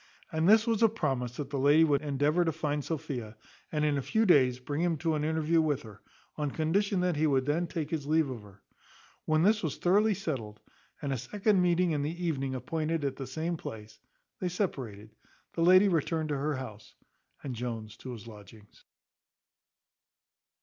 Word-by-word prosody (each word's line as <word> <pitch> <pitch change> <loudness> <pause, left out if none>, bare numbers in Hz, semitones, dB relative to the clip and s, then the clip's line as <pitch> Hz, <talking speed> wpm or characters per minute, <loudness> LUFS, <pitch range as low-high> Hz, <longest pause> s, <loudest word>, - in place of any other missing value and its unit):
And 160 +3 +2
this 220 +1 +6
was 230 -2 0
a 225 - +6
promise 135 - -2
that 140 -2 -5
the 140 - -1
lady 145 +4 +5
would 145 -3 +2
endeavour 150 +4 +1
to 165 - +1
find 150 -2 -2
out 145 - -6
Sophia, 135 -9 -4 0.4
and 150 -1 0
in 145 -2 +1
a - - -2
few 220 - +1
days 130 - +5
bring 145 +4 -4
him 170 -2 +1
to 160 +1 0
an 150 -1 -1
interview 160 +1 +2
with 150 -4 0
her, 105 -3 -13 0.4
on 150 -1 -1
condition 180 +6 0
that 180 -3 0
he 155 +1 +3
would 135 -3 +2
then 160 +4 0
take 155 -3 -4
his 150 -4 -3
leave 155 0 +3
of 125 -4 -6
her. 100 -1 -17 0.6
When 155 +1 +2
this 210 +3 +4
was 160 -5 -3
thoroughly 205 +4 +3
settled, 125 - -4 0.4
and 140 -1 -1
a 130 - -2
second 200 - +1
meeting 175 0 +2
in 150 -2 0
the 170 +5 -3
evening 135 -5 -1
appointed 160 +2 -2
at 135 -1 -1
the 135 - -5
same 160 +6 -3
place, 110 -5 -9 0.4
they 180 - -1
separated; 120 - -4 0.4
the 165 - -2
lady 185 +4 +7
returned 160 -2 0
to 145 - -1
her 145 +2 -1
house, 110 -5 -9 0.5
and 135 - -4
Jones 115 -3 -5
to 130 - -7
his 115 -3 -10
lodgings. 105 -1 -14
150 Hz, 195 wpm, -30 LUFS, 130-170 Hz, 0.6 s, lady